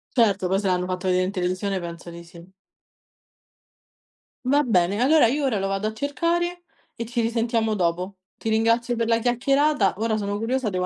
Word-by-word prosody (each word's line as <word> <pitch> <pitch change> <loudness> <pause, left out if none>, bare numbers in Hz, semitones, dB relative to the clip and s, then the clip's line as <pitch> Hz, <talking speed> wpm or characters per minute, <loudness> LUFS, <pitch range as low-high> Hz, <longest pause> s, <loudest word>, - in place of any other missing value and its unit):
Certo, 205 -6 +3
poi 190 +2 +1
se 200 - -2
hanno 180 -1 +1
fatto 185 +1 -3
vedere 185 0 +2
in 190 - -3
televisione, 185 +1 -2
penso 170 0 -8
di 170 0 -10
sì. 170 +2 -15 1.9
Va 285 +3 +3
bene, 200 -2 +1
allora 295 0 +5
io 285 +4 -1
ora 230 -6 +1
lo 195 - -2
vado 195 +2 -1
a 215 - -4
cercare 340 +7 -1 0.3
e 230 -1 -5
ci 240 -1 -1
risentiamo 230 -1 0
dopo. 180 +1 -1 0.2
Ti 225 - -4
ringrazio 230 +2 +2
per 230 0 -1
la 230 0 +3
chiacchierata. 270 0 +2
Ora 220 0 0
sono 205 0 -2
curiosa, 235 +1 -1
devo 180 -1 -2
220 Hz, 180 wpm, -24 LUFS, 185-245 Hz, 1.9 s, allora